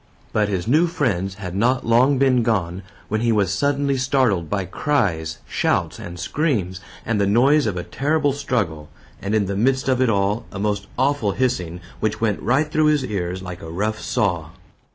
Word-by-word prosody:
But 105 -1 +2
his 95 -2 -2
new 155 +8 +4
friends 95 - -1
had 95 -3 -6
not 125 +5 +1
long 125 +5 +4
been 130 -2 +3
gone, 95 -6 0 0.3
when 110 +1 -1
he 120 0 +2
was 100 -4 +2
suddenly 140 +3 +1
startled 125 - +1
by 100 -2 -1
cries, 90 - -1
shouts, - - 0
and 90 0 -8
screams, 100 - -1 0.3
and 110 -3 0
the 100 - +2
noise 135 +7 +4
of 95 -4 -2
a 90 - -3
terrible 145 - 0
struggle, 105 - -2 0.3
and 100 +2 -1
in 105 -2 +2
the 100 +1 -3
midst 130 +5 +1
of 130 -1 +2
it 130 - +3
all, 100 +1 0
a - - -7
most 100 0 -1
awful 130 -6 +1
hissing, 90 -10 -1 0.2
which 110 -1 -1
went 110 -3 0
right 145 +5 +1
through 155 0 +3
his 150 -3 +2
ears 95 -4 -3
like 90 -1 -7
a 80 - -8
rough 105 +6 -2
saw. 85 -7 -1
110 Hz, 190 wpm, -22 LUFS, 95-130 Hz, 0.3 s, new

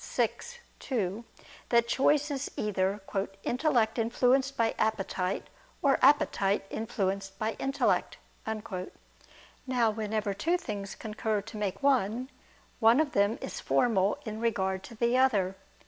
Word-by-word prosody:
vi, - - +4 0.5
2) 220 -3 -2 0.4
that 235 -1 +4
choice 290 +4 +2
is 280 0 -3
either 200 -1 0 0.4
"intellect 245 -4 +1
influenced 255 +4 +2
by 230 -1 +2
appetite 195 -3 -1 0.4
or 275 -2 +4
appetite 255 -9 +3
influenced 195 -3 -2
by 220 +2 -1
intellect." 270 +1 0 1.5
Now 245 -3 +2
whenever 215 -1 -2
two 335 - +1
things 200 - -6
concur 215 -1 -2
to 225 +2 -11
make 205 +2 -3
one, 255 -2 +1 0.5
one 230 +3 +6
of 310 -2 +1
them 200 +4 +2
is - - -5
formal 205 -5 +2
in 215 -1 -5
regard 190 -5 0
to 230 - -11
the 235 +3 +2
other. 200 -8 +2
220 Hz, 125 wpm, -29 LUFS, 200-255 Hz, 1.5 s, one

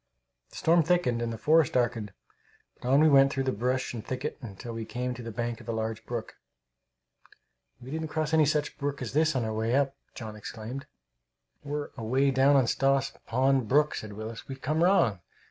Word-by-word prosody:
The - - -17
storm 170 +1 +4
thickened 160 -8 +1
and 120 0 -1
the 115 - -5
forest 155 +2 +3
darkened, 120 -4 0 0.7
but 125 - -3
on 140 +3 +5
we 155 - +6
went 135 -2 +6
through 135 - -1
brush 130 +1 -1
and 115 -3 -6
thicket 130 +5 -4 0.2
till 120 +3 -7
we 115 0 -4
came 125 +2 -3
to 125 - -8
the 115 - -6
bank 120 0 -3
of 115 - -11
a - - +1
large 110 0 -3
brook. 120 -2 -5 1.4
"We 125 +2 -10
didn't 160 +1 -3
cross 155 0 -2
any 155 -2 +5
such 150 0 -1
brook 140 -2 -2
as 120 - -5
this 155 +1 +2
on 125 -3 0
our 110 - -2
way 110 +3 0
up!" 140 -1 +1 0.2
John 110 -3 -7
exclaimed. 115 +6 -7 0.8
"We're 145 0 -4
away 130 +4 +2
down 135 +2 +4
on 135 -2 +5
Stoss 135 +2 +2 0.2
Pond 130 0 +2
brook," 150 +5 +3
said 110 -1 -6
Willis. 110 +2 -7
"We've 135 -1 -7
come 155 +5 +1
wrong! 175 - +3
130 Hz, 195 wpm, -28 LUFS, 115-145 Hz, 1.4 s, we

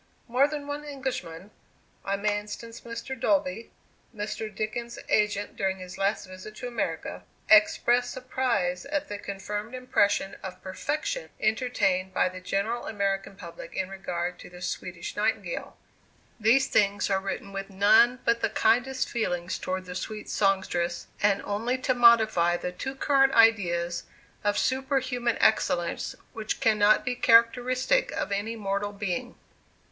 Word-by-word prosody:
More 255 +4 +4
than 295 -1 -5
one 290 +1 -5
Englishman 255 - -5 0.5
I 200 - -1
may 205 0 0
instance 230 +2 -9
Mr. 235 +3 -6
Dolby, 205 -2 0 0.5
Mr. 215 +1 -4
Dickens's 220 +3 -4
agent 210 -1 +1
during 190 -1 -1
his 185 0 -9
last 195 +2 0
visit 185 +3 -10
to 245 - -6
America 165 - -3 0.3
expressed 240 +3 +5
surprise 250 -8 -1
at 295 0 -2
the 205 - -5
confirmed 205 +4 -5
impression 205 -6 +1
of 185 -1 -7
"perfection" 305 - -3
entertained 215 -5 0
by - - +3
the 185 0 -9
general 200 +6 -2
American 195 -1 -2
public 170 -3 -10
in 190 - -2
regard 180 -2 -4
to - - -11
the 180 0 -12
Swedish - - -5
Nightingale. - - -2 0.6
These 235 +5 +4
things 205 -2 +2
are 190 - +3
written 195 0 -5
with 195 0 -5
none 220 +6 +5
but 235 0 +2
the - - +1
kindest 260 +2 +2
feelings 180 -6 -2
towards 185 0 -3
the 180 - -7
sweet 210 +3 -5
songstress, 190 -3 0 0.2
and 200 -1 +3
only 230 +5 -1
to 255 0 +1
modify 220 -8 +5
the 180 - -4
too 265 +9 -5
current 270 -1 +3
ideas 175 -7 +3 0.4
of 205 0 +1
superhuman 260 -3 0
excellence 175 -5 +1 0.2
which 220 -1 -3
cannot 215 -1 +4
be 245 - 0
characteristic 245 - +3
of 305 -6 -3
any 205 +3 -2
mortal 205 -1 -2
being. 210 +4 -3
210 Hz, 140 wpm, -27 LUFS, 195-245 Hz, 0.6 s, expressed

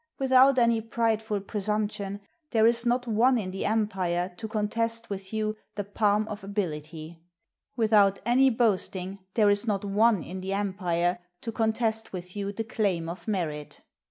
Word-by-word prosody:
Without 265 0 +5
any 235 -2 +3
prideful 220 -2 -1
presumption, 205 0 -3 0.3
there 220 -2 +3
is 235 +1 +3
not 245 +1 +1
one 240 +3 +3
in 190 -5 -3
the 190 - -4
empire 190 -5 -1
to 225 - -5
contest 230 +1 -1
with 190 -1 -5
you 215 -1 -1 0.2
the 205 - -2
palm 205 +1 +1
of 210 -2 -7
ability; 165 -4 -5 0.6
without 210 -3 +4
any 260 +3 +5
boast 225 -6 +1
ing, 190 +2 -5 0.2
there 210 -3 +5
is 205 +3 +2
not 205 -1 -1
one 205 -2 +3
in 185 +3 -7
the 190 +1 -3
empire 180 -3 0 0.2
to 230 - -4
contest 225 -1 -1
with 180 0 -6
you 200 -1 -3
the 225 +2 -4
claim 195 -7 -1
of 170 +6 -7
merit. 160 -8 -3
210 Hz, 160 wpm, -27 LUFS, 190-225 Hz, 0.6 s, Without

